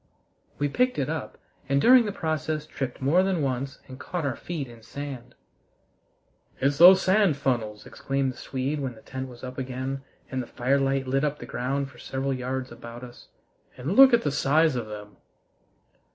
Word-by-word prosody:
We 145 - +1
picked 250 - +1
it 135 -3 -1
up, - - -5 0.3
and 140 0 +3
during 245 - +7
the 205 - -2
process 155 -3 -2
tripped 135 -4 -5
more 160 +7 +4
than 185 -5 0
once 135 +1 -2
and 130 0 -10
caught 175 0 -4
our 135 -4 -1
feet 155 -3 -5
in 115 -1 -14
sand. 135 0 -8 1.2
"It's 140 +2 +1
those 185 +2 +9
sand 190 -5 +3
funnels," 115 -6 -2
exclaimed 135 -1 -2
the - - -18
Swede, 135 +4 -3
when 130 -4 -4
the 110 - -17
tent 130 0 -6
was 120 0 -13
up 130 +1 -6
again 130 +1 -4 0.3
and 130 -1 -1
the 120 - -7
firelight 135 +1 +1
lit 135 +2 0
up 150 0 0
the - - -8
ground 135 +2 -2
for - - -17
several 135 +1 -2
yards 130 0 -3
about 120 +1 -10
us. 120 -1 -12 0.5
"And 140 +10 -2
look 270 +1 +9
at 235 -1 +4
the 145 - 0
size 150 +2 +3
of 120 -3 -3
them!" 105 -1 -9
135 Hz, 185 wpm, -26 LUFS, 125-150 Hz, 1.2 s, those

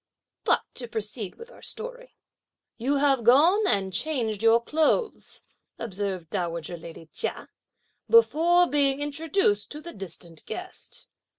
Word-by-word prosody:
But - - +3
to 240 - -7
proceed 215 -2 -4
with 470 +2 -12
our - - -16
story. - - -7 0.6
"You 265 +5 +1
have 275 -3 +3
gone 330 - +5
and 190 - +2
changed 225 -4 -1
your 225 +1 +6
clothes," 315 - 0 0.3
observed 195 -6 -4
dowager 170 -3 -3
lady 165 0 -10
Chia, - - -3 0.6
"before 350 -6 +5
being 280 -3 +2
introduced 290 - 0
to 300 - -6
the 340 +2 -9
distant 170 -4 -7
guest. - - -7
255 Hz, 125 wpm, -26 LUFS, 200-320 Hz, 0.6 s, your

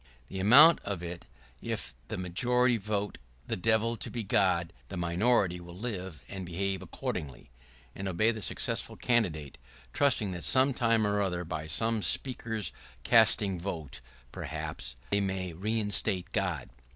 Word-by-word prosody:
[¶35] 65 - -28 0.2
The 95 - -5
amount 140 - +8
of 100 -4 -5
it 85 0 -6 0.4
is, - - -7
if - - -5
the - - -4
majority 120 +7 +2
vote 105 0 -3 0.3
the - - -2
Devil 110 +4 +1
to - - -3
be 120 -2 -4
God, 90 -3 +1
the 95 - -6
minority 90 +1 +2
will 85 0 -11
live 95 -7 -5
and 95 -1 -6
behave 95 +2 -2
accordingly 70 -5 -5 0.2
— - - -27
and 95 - -4
obey 95 +5 +2
the 110 -2 -6
successful - - -2
candidate, 85 - 0 0.3
trusting 125 -8 +2
that, 90 -1 -5
some 135 +1 +4
time 115 -2 +2
or 105 0 +1
other, 90 -3 -1
by 80 -2 -5
some 110 +8 +1
Speaker's 110 -5 -1 0.3
casting 95 -3 +4
vote, 80 -8 -5 0.3
perhaps, - - -5 0.2
they 100 - +3
may 95 -2 -2
reinstate 105 -1 0
God. 85 -11 -2
95 Hz, 155 wpm, -30 LUFS, 85-110 Hz, 0.4 s, amount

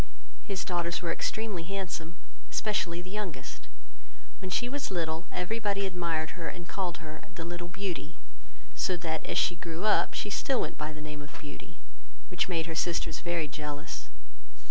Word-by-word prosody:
His 195 -3 -1
daughters 175 -1 +1
were 170 - +3
extremely 215 0 0
handsome, 175 -2 -2 0.3
especially 175 -5 +2
the 185 - -7
youngest; 185 -11 -3 0.7
when 190 - -3
she 245 +6 +3
was 280 +3 0
little, 165 -2 0
every 220 +6 0
body 200 -2 +2
admired 170 -4 +1
her, 165 -2 -3
and 175 -1 -4
called 180 -3 0
her 155 0 -6
The 165 - -3
little 175 0 -3
Beauty; 175 -4 -2 0.6
so 185 - +2
that, 160 -2 0
as - - +2
she 175 - +5
grew 165 +3 -2
up, 215 - +6
she 205 - 0
still 265 +5 +3
went - - 0
by 150 +1 -1
the 150 0 -6
name 150 -1 -4
of 145 0 -8
Beauty, 145 -1 -8 0.5
which - - +2
made 165 -3 +2
her 165 - -2
sisters 165 -1 +2
very 170 -3 +1
jealous. 150 0 -3
175 Hz, 170 wpm, -32 LUFS, 160-190 Hz, 0.7 s, up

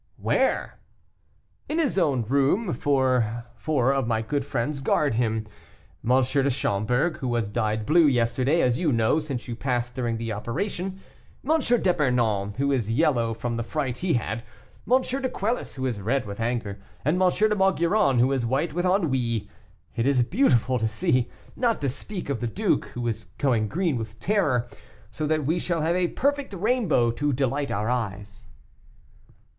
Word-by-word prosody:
"Where?" - - 0 0.9
"In 310 - -1
his 285 -11 +1
own 140 -8 +2
room. 140 - +1
Four 130 -4 +1 0.3
of 135 -3 +2
my 110 -1 0
good 140 +4 -1
friends 140 +2 -2
guard 140 0 +1
him. 110 -1 0 0.6
M. - - -3
de 135 +2 +1
Schomberg, 125 - 0
who 130 - -3
was 120 -3 0
dyed 110 0 -1
blue 165 +3 +5
yesterday, 130 +4 +2
as 125 +1 +2
you 165 -4 +1
know, 115 +5 +2
since 140 -6 -5
you 120 - -4
passed 120 -1 -2
during 120 -3 -2
the 115 -1 -3
operation; 180 - -4 0.5
M. 320 +1 +4
d'Epernon, 125 - +1
who 140 +1 +1
is 120 -6 0
yellow 115 -1 +2
from 120 +1 -3
the - - -1
fright 130 0 -3
he 180 -2 0
had; 115 -1 -2 0.5
M. 260 +1 +5
de 260 +1 -2
Quelus, 225 +4 -2
who 130 -1 -3
is 115 -6 -2
red 120 +4 0
with 100 0 -7
anger; 115 -4 -2 0.2
and 170 +6 +2
M. 185 - +5
de 215 +3 +2
Maugiron, 190 - +2
who 125 +3 +4
is 135 -3 0
white 135 +7 0
with 175 +2 0
ennui; 130 - 0 0.5
it 120 +1 0
is 135 -3 +3
beautiful 130 - +2
to 110 - +1
see; 115 +2 +1 0.3
not 235 -3 +1
to 140 - -1
speak 180 +8 -5
of 140 -4 -2
the 120 - -2
duke, 110 - 0
who 120 -1 -2
is 110 -1 -3
going 120 -6 +1
green 165 - 0
with 110 -1 -7
terror, 145 - +1 0.4
so 155 - -3
that 155 -2 0
we 165 +5 +1
shall 170 -2 -1
have 165 +3 +1
a 180 -1 +2
perfect 280 0 -1
rainbow 190 - +2
to 145 +5 -1
delight 140 +2 -1
our 105 +4 -1
eyes." 105 -4 -4
130 Hz, 170 wpm, -25 LUFS, 115-165 Hz, 0.9 s, blue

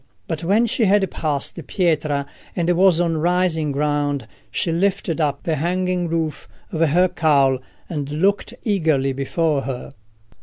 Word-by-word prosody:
But 165 -1 -3
when 205 +7 +3
she 235 0 +1
had 195 -1 +3
passed 145 -3 -2
Pietra 150 -6 0 0.3
and 170 -1 0
was 180 -1 +4
on 165 -2 +1
rising 170 -2 +1
ground, 145 -3 -1 0.2
she 165 +8 -1
lifted 175 -2 0
up 145 -2 -1
the 160 -2 0
hanging 180 +2 0
roof 160 -2 -2 0.2
of 165 -4 -2
her 180 +5 +4
cowl 140 -6 +3 0.3
and 145 -4 -4
looked 195 +9 0
eagerly 160 - +1
before 145 +2 0
her. 130 -2 -6
165 Hz, 145 wpm, -21 LUFS, 145-180 Hz, 0.3 s, was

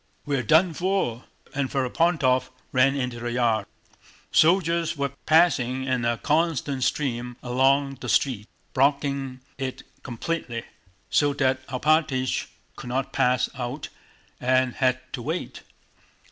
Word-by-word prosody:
We're 140 -3 0
done 160 - +4
for!..." 175 -9 -1 0.3
and 140 -2 -1
Ferapóntov 135 -1 +1 0.2
ran 135 +2 +4
into 125 -3 -3
the 120 0 -3
yard. 115 -4 +1 0.6
Soldiers 170 -1 +3
were 140 -1 -1 0.2
passing 135 -6 +3
in 130 -2 0
a 120 0 +1
constant 150 -4 0
stream 125 -4 -1
along 135 +2 +2
the 125 - -5
street 115 -2 +1 0.3
blocking 140 -1 0 0.2
it 130 -1 -4 0.2
completely, 120 -1 -4 0.5
so 145 -1 +3
that 130 -1 +1
Alpátych 135 -1 +1 0.3
could 125 - -8
not 130 +2 -2
pass 125 0 +2
out 125 +3 -5 0.5
and 130 0 +2
had 130 -1 +2
to 125 - -4
wait. 160 +8 -4
130 Hz, 120 wpm, -25 LUFS, 125-145 Hz, 0.6 s, done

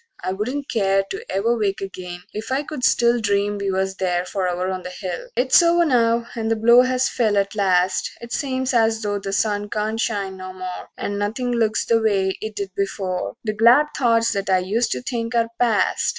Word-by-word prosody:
I - - -1
wouldn't 255 +8 -3
care 195 -3 +1
To 405 +4 -5
ever 230 +5 +1
wake 205 -4 -1
again 180 -2 -7
if 220 +4 -6
I 270 +2 0
could 300 -3 -7
still 235 -1 +3
Dream 205 0 0
we 200 -1 -2
was 190 0 -1
there 180 -1 0
forever 180 -1 -2
on 185 -1 -4
the 180 - -7
hill. 180 -1 -6
XXVII - - -20
It's 255 +4 +5
over 340 0 +4
now; 235 -4 +2
the 225 -1 0
blow 235 +3 +6
has 255 0 +1
fell 215 -4 +1
at 200 0 0
last; 185 -3 +1
It 235 0 -8
seems 260 -2 -1
as 225 -1 +2
though 205 -1 -1
the 195 0 -5
sun 205 0 0
can't 215 +2 -2
shine 200 -4 -2
no 185 0 -8
more, 185 -1 -7
And 205 0 -3
nothing 235 +5 -2
looks 225 -2 +1
the 230 -1 +2
way 195 -3 +1
it 220 -1 -5
did 200 -1 -4
before; 190 -1 -3
The 215 -2 -2
glad 240 +8 +5
thoughts 230 -3 +2
that 200 -1 -3
I 190 - +4
used 205 +6 0
to - - -5
think 235 -2 -3
are 230 -1 +2
past. 230 -4 +2
215 Hz, 210 wpm, -21 LUFS, 195-235 Hz, -, blow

